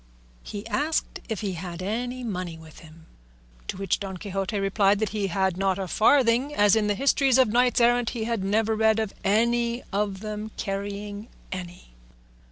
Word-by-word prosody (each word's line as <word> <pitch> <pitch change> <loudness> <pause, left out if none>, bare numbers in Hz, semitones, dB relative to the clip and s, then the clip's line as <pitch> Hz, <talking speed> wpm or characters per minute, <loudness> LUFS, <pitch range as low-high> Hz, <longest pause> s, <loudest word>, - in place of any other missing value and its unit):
He 205 +1 -7
asked 290 +8 -1
if 220 -4 -3
he 200 -2 -2
had 175 0 -6
any 245 +5 -3
money 180 -7 -4
with 160 -1 -14
him, 160 0 -15 0.6
to - - -4
which 195 -2 0
Don 190 -2 -5
Quixote 195 +1 -3
replied 195 +1 +3
that 215 0 -1
he 205 -1 -1
had 190 0 0
not 195 0 +1
a 190 -1 -3
farthing, 250 - +3
as 205 0 +5
in 215 -2 +2
the 205 - +1
histories 270 +1 +3
of 260 -4 +5
knights 245 +3 +3
errant 240 0 +3
he 235 -2 -4
had 230 -3 -1
never 220 +3 +1
read 220 0 +3
of 220 -3 -2
any 235 +3 +1
of 200 -1 -1
them 215 0 -5
carrying 205 +1 -4 0.2
any. 180 - -8
210 Hz, 175 wpm, -26 LUFS, 195-230 Hz, 0.6 s, as